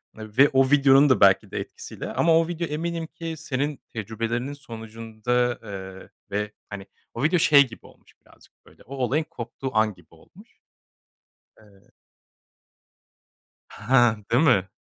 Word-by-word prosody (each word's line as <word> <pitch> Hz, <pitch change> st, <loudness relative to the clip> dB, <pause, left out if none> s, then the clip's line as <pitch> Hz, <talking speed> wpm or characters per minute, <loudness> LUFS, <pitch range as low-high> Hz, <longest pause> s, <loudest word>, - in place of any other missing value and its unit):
ve 110 Hz, +6 st, +2 dB
o 135 Hz, 0 st, +2 dB
videonun 140 Hz, 0 st, +5 dB
da 130 Hz, -, +3 dB
belki 100 Hz, -1 st, +4 dB
de -, -, -3 dB
etkisiyle. -, -, -8 dB
Ama 165 Hz, -1 st, +3 dB
o 165 Hz, -, +2 dB
video 170 Hz, -1 st, -3 dB
eminim 165 Hz, +2 st, -4 dB
ki 165 Hz, 0 st, -7 dB
senin 145 Hz, -1 st, -3 dB
tecrübelerinin 115 Hz, +5 st, -4 dB
sonucunda, 115 Hz, -1 st, -3 dB
eee, 95 Hz, -2 st, -9 dB, 0.2 s
ve, 105 Hz, +1 st, -2 dB, 0.2 s
hani, 100 Hz, -1 st, -8 dB, 0.3 s
o 120 Hz, -, -4 dB
video 165 Hz, +3 st, +3 dB
şey 140 Hz, -3 st, +6 dB
gibi 115 Hz, -, -14 dB
olmuş -, -, -20 dB
birazcık, -, -, -23 dB
böyle, -, -, -20 dB
o 135 Hz, -, -9 dB
olayın 135 Hz, +4 st, 0 dB
koptuğu 130 Hz, -2 st, -6 dB
an 110 Hz, -1 st, +2 dB
gibi 90 Hz, -3 st, -22 dB
olmuş. -, -, -20 dB, 1.0 s
Eee. 100 Hz, -3 st, -23 dB, 1.8 s
Ha, 120 Hz, -1 st, +2 dB
değil 125 Hz, +6 st, +3 dB
mi? 100 Hz, -, +3 dB
125 Hz, 140 wpm, -24 LUFS, 110-145 Hz, 1.8 s, şey